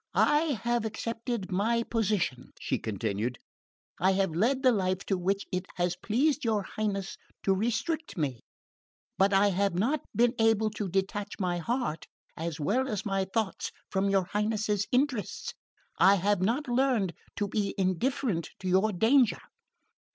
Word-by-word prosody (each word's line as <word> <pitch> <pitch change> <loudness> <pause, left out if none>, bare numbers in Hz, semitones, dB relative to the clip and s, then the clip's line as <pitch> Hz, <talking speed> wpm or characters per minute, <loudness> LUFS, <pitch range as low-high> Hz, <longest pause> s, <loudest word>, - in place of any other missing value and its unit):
"I 295 -4 +3
have 240 -1 +1
accepted 225 -1 -3
my 225 +5 +1
position," 210 - -1
she - - -1
continued. 110 +2 -2 0.6
"I 190 +2 +4
have 190 -3 +1
led 250 - +1
the 255 - +6
life 185 -3 0
to 195 - +1
which 195 +2 -1
it 185 0 -2
has 175 0 0
pleased 270 - +1
your 220 -3 +1
Highness 200 -2 -3 0.3
to 195 - +3
restrict 240 - -1
me. 135 -7 -1 0.8
But 195 +1 +4
I 200 +1 +5
have 195 -1 +1
not 250 +12 +1
been 240 0 +4
able 220 -1 +3
to 210 -2 -4
detach 195 +3 -1
my 180 -2 0
heart 230 -4 -2 0.3
as 165 -1 -4
well 235 - +1
as 215 -3 -3
my 195 -2 0
thoughts 220 -3 -1 0.2
from 195 0 +1
your 195 -1 +3
Highness's 210 +1 -1
interests. 250 - 0 0.5
I 190 +3 +7
have 200 0 +1
not 240 +10 0
learned 240 -7 +1 0.2
to 205 - -1
be 200 -1 -1
indifferent 190 - 0
to 185 - -4
your 190 +4 +3
danger." 230 +5 +4
205 Hz, 150 wpm, -29 LUFS, 185-230 Hz, 0.8 s, I